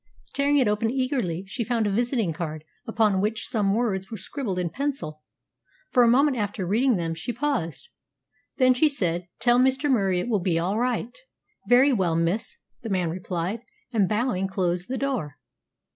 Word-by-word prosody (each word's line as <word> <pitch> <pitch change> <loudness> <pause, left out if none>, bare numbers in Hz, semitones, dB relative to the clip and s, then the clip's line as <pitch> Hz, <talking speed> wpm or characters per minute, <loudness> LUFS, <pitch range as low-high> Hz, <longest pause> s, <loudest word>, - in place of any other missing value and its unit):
Tearing 285 +1 +2
it 260 -5 +3
open 210 +2 +1
eagerly, 250 - -1
she 215 +5 -3
found 230 -1 0
a 205 - +1
visiting 230 - 0
card, 155 -1 -5 0.2
upon 215 -4 +2
which 215 +2 -1
some 205 -5 +1
words 195 -5 -1
were 220 - -6
scribbled 205 -1 -4
in 175 -2 -1
pencil. 260 - -3 0.7
For 250 - +5
a 240 - +6
moment 265 +3 +4
after 205 -3 -2
reading 235 +7 +2
them 165 -3 -2
she 165 +9 -4
paused. 235 - -2 0.7
Then 255 -1 +5
she 300 +5 +3
said, 175 - -1
"Tell 240 0 +4
Mr. 265 +3 +2
Murie 195 -7 +2
it 180 - -3
will 220 -4 +1
be 175 -2 0
all 185 +6 0
right." 245 -1 -1 0.5
"Very 260 +3 +6
well, 180 -7 +1
miss," 170 +6 0 0.2
the 225 - -6
man 180 -4 0
replied, 180 +4 -3 0.3
and, 200 -5 +2
bowing, 215 -4 0
closed 180 -2 -1
the 260 - -3
door. 245 - -2
215 Hz, 175 wpm, -25 LUFS, 180-250 Hz, 0.7 s, a